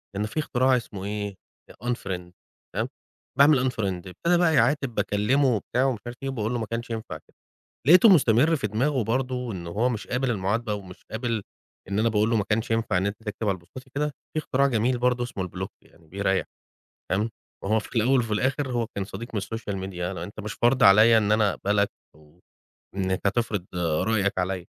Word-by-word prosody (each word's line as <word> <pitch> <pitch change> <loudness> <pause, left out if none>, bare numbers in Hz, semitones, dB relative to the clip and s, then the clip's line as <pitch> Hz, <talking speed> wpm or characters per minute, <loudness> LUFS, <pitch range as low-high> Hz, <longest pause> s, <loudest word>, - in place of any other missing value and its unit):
لأن 105 +2 -1
في 110 +8 -3
اختراع 130 -3 +2
اسمه 105 -5 -6
إيه، 105 -1 -3 0.5
Unfriend 95 -8 -3 0.4
تمام، - - 0 0.5
باعمل 140 -3 +5
Unfriend 95 -6 -3
ابتدى 170 - +1
بقى 170 -2 +3
يعاتب 135 -1 +2
باكلمه 125 +8 +2
وبتاع 120 +5 -1
ومش 125 -6 0
عارف 120 +1 -7
إيه، 135 - -1
وباقول 115 -4 -2
له 120 - -1
ما 110 - -2
كانش 115 +2 -4
ينفع 110 -1 -5
كده، - - -27 0.5
لقيته 180 +8 +8
مستمر 150 - +5
في 130 - -2
دماغه 125 +6 0
برضو 125 +1 -1
إن 90 -3 -6
هو 105 +9 0
مش 115 -4 -4
قابل 125 +1 0
المعاتبة 105 +1 -1
ومش 95 -3 -10
قابل 115 -1 -2 0.5
إن 100 +2 -1
أنا 115 +1 +3
باقول 105 0 +2
له 115 - +3
ما 105 - +1
كانش 115 +3 -1
ينفع 115 -4 +1
إن 95 - 0
أنت 100 +1 -2
تكتب 105 0 -3
على 95 -2 0
بوستاتي 130 +10 -13
كده، 150 +2 +1 0.3
في - - 0
اختراع 140 -2 +2
جميل 125 0 +1
برضو 125 0 +1
اسمه 95 -7 -4
الBlock 95 +2 -5 0.2
يعني 80 -1 -23
بيريّح، 95 +1 0 0.7
تمام؟ 105 +4 +1 0.3
وهو 110 +3 +2
في 110 - -11
الأول 125 +4 +4
وفي 115 -3 -1
الآخر 130 +3 0
هو 120 -2 0
كان 100 - -2
صديق 115 +3 -8
من 100 - 0
الSocial 105 0 -5
Media 90 -2 -7 0.2
أنت 90 +6 -7
مش 105 0 -5
فرض 125 +2 +2
عليَّ 110 +4 +8
إن 105 -1 +2
أنا 105 -2 +3
أقبلك 100 0 +1 0.3
أو 75 +3 -22 0.6
إنك 95 -1 0
هتفرض 105 -3 0
رأيك 95 +5 +1
عليَّ، 90 -1 -2
110 Hz, 195 wpm, -25 LUFS, 100-125 Hz, 0.7 s, لقيته